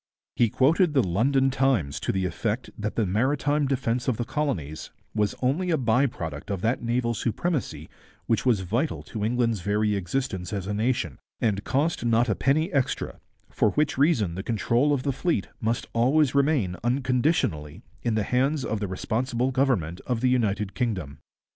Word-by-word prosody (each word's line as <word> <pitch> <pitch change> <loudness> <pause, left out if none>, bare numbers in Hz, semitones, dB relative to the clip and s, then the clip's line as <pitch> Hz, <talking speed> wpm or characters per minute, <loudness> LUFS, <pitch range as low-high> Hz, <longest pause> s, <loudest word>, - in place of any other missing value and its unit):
He 120 - +3
quoted 155 - +3
the 135 - +5
London 130 +9 +2
Times 130 - +1
to - - -1
the 95 -1 -1
effect 105 +7 -2
that 105 0 -4
the 115 - +1
maritime 140 +8 +1
defence 125 -2 -1
of 125 -4 +1
the 120 - -2
colonies 95 - -3 0.2
was 105 -2 0
only 155 +9 +1
a 165 - +3
by 125 +2 +3
product 80 - -6
of 100 -3 -2
that 115 +5 0
naval 120 0 0
supremacy 115 - -2 0.4
which 115 - +1
was 120 -7 +2
vital 115 - -1
to 110 -3 -5
England's 115 -2 +1
very 105 +3 +1
existence 95 0 -3
as 100 -2 -3
a 105 - -2
nation, 105 - -1 0.2
and 105 -3 0
cost 150 +3 0
not 120 +1 +2
a - - +3
penny 155 - +1
extra, 135 -3 -1 0.3
for - - +2
which 150 -1 +1
reason 130 - +2
the 95 - -4
control 120 +6 +1
of 140 -3 0
the 140 - 0
fleet 135 - -1
must 115 +1 -1
always 130 +4 +3
remain 140 - +2
unconditionally 125 - 0 0.2
in 115 -2 0
the 110 - +1
hands 135 +5 +1
of 110 - -2
the 100 - -2
responsible 120 +7 -1
government 120 - 0
of 120 -3 -1
the 130 - +3
United 105 -5 0
Kingdom. 90 - -3
120 Hz, 175 wpm, -26 LUFS, 100-135 Hz, 0.4 s, the